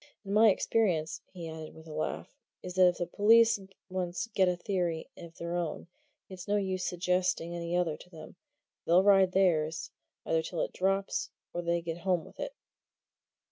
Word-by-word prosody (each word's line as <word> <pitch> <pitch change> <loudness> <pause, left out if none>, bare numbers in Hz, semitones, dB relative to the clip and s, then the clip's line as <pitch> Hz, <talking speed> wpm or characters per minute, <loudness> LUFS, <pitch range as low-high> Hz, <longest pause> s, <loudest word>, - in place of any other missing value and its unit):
And 195 - -3
my 220 +1 +7
experience," 185 -6 +1
he 175 -3 -7
added 160 -1 -8
with 160 - -13
a 155 - -9
laugh, 155 - -4 0.3
"is 180 - -6
that 185 0 +6
if 175 - +1
the 175 - -1
police 225 +4 +5 0.3
once 180 -1 -3
get 190 -1 +4
a 180 - 0
theory 175 -3 -2
of 165 -1 -12
their 170 +1 -4
own, 175 0 -3 0.4
it's 185 -2 -9
no 205 - +1
use 190 -2 -1
suggesting 180 -1 0
any 170 +1 -2
other 165 -4 0
to - - -15
them 160 -3 -12 0.5
they'll 175 +3 +4
ride 195 -2 +5
theirs, 160 -5 +1 0.3
either 160 - +2
till 160 +1 -4
it - - -2
drops 195 +1 0 0.2
or 175 - -2
they 170 0 0
get 165 0 -4
home 180 -2 0
with - - -16
it." - - -5
180 Hz, 180 wpm, -30 LUFS, 170-190 Hz, 0.5 s, my